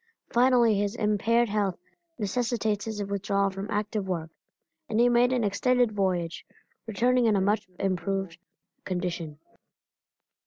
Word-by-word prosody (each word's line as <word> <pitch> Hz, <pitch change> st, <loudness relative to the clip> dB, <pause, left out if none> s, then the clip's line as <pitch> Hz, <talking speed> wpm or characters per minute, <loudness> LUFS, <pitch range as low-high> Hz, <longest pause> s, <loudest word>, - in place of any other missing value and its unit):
Finally 240 Hz, -2 st, +4 dB
his 205 Hz, +2 st, -1 dB
impaired 230 Hz, +2 st, +2 dB
health 200 Hz, -3 st, -1 dB, 0.4 s
necessitated 220 Hz, -1 st, -1 dB
his 215 Hz, -2 st, -3 dB
withdrawal 200 Hz, 0 st, 0 dB
from 195 Hz, +2 st, -6 dB
active 210 Hz, -1 st, -2 dB
work, 165 Hz, -3 st, -3 dB, 0.6 s
and 220 Hz, -, 0 dB
he 240 Hz, -, +6 dB
made 245 Hz, +1 st, +4 dB
an 250 Hz, -2 st, +1 dB
extended 245 Hz, +3 st, +2 dB
voyage, 185 Hz, -4 st, -1 dB, 0.4 s
returning 240 Hz, +3 st, +2 dB
in 215 Hz, -, +3 dB
a -, -, +3 dB
much 205 Hz, +1 st, +1 dB
improved 195 Hz, -2 st, -2 dB, 0.4 s
condition. 175 Hz, -4 st, -4 dB
205 Hz, 125 wpm, -27 LUFS, 195-230 Hz, 0.6 s, he